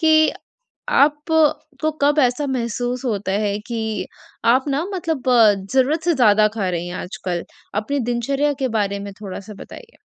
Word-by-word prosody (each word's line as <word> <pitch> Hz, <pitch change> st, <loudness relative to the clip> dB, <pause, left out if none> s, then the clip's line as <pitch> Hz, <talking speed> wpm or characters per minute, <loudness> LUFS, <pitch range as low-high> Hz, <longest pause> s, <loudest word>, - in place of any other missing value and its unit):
कि 315 Hz, -1 st, +5 dB, 0.6 s
आप 295 Hz, +1 st, +4 dB, 0.7 s
को 310 Hz, -, +2 dB
कब 290 Hz, +2 st, +3 dB
ऐसा 250 Hz, +3 st, +1 dB
महसूस 245 Hz, 0 st, -2 dB
होता 205 Hz, -5 st, -1 dB
है 205 Hz, 0 st, -1 dB
कि 220 Hz, -2 st, -3 dB, 0.5 s
आप 260 Hz, +1 st, +2 dB
ना 285 Hz, +3 st, 0 dB
मतलब 325 Hz, -7 st, -2 dB, 0.5 s
ज़रूरत 270 Hz, +5 st, +2 dB
से 345 Hz, -1 st, +3 dB
ज़्यादा 215 Hz, -5 st, +5 dB
खा 200 Hz, -4 st, -1 dB
रही 175 Hz, 0 st, -3 dB
हैं 175 Hz, -, -6 dB
आजकल? 180 Hz, -3 st, -4 dB, 0.3 s
अपनी 215 Hz, +8 st, -1 dB
दिनचर्या 275 Hz, +5 st, 0 dB
के 260 Hz, -, +1 dB
बारे 200 Hz, -1 st, -1 dB
में 200 Hz, 0 st, -7 dB
थोड़ा-सा 200 Hz, +1 st, -7 dB
बताइए? 470 Hz, -1 st, -12 dB
245 Hz, 155 wpm, -21 LUFS, 205-285 Hz, 0.7 s, कि